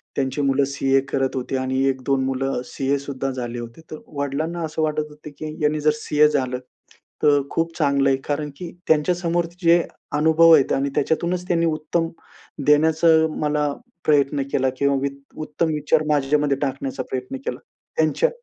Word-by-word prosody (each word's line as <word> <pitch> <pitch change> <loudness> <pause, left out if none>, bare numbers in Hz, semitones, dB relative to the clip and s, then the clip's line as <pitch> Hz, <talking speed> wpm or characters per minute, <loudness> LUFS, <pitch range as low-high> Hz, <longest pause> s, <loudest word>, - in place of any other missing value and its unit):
त्यांची 135 +1 -1
मुलं 140 0 +2
सीए 135 0 +1
करत 135 -1 0
होते 130 +1 -3
आणि 130 0 -1
1-2 130 0 0
मुलं 135 -1 -1
सीए 140 +1 -1
सुद्धा 135 -1 -4
झाले 120 -2 -5
होते. 120 +7 -9
तर 155 - -4 0.2
वडिलांना 155 +5 -2
असं 160 0 -4
वाटत 155 -1 0
होतं 150 0 -11
की 155 - -5
ह्यांनी 150 0 +1
जर 150 - +4
सीए 150 0 +3
झालं, 130 -4 -1 0.6
तर 145 -1 +5
खूप 165 0 -1
चांगलं 140 -3 +2
आहे. 135 - +2
कारण 150 0 -2
की 175 -2 -7 0.2
त्यांच्यासमोर 170 +2 +2 0.2
जे 170 +1 +6 0.4
अनुभव 160 +2 +6
आहेत 140 -4 +2
आणि 140 +1 0
त्याच्यातूनच 170 +5 0
त्यांनी 170 -1 +2
उत्तम 165 +1 -1 0.6
देण्याचा 160 +2 +4 0.3
मला 150 -1 +1 0.3
प्रयत्न 145 -1 +3
केला 130 0 +2
किंवा 140 0 +2
वित्त 140 0 -6
उत्तम 160 +2 -1
विचार 150 +1 +1
माझ्यामध्ये 145 -1 +2
टाकण्याचा 135 -1 -2
प्रयत्न 130 0 -4
केला. 125 - -3 0.4
त्यांच्या 160 - +2
145 Hz, 160 wpm, -22 LUFS, 135-155 Hz, 0.6 s, जे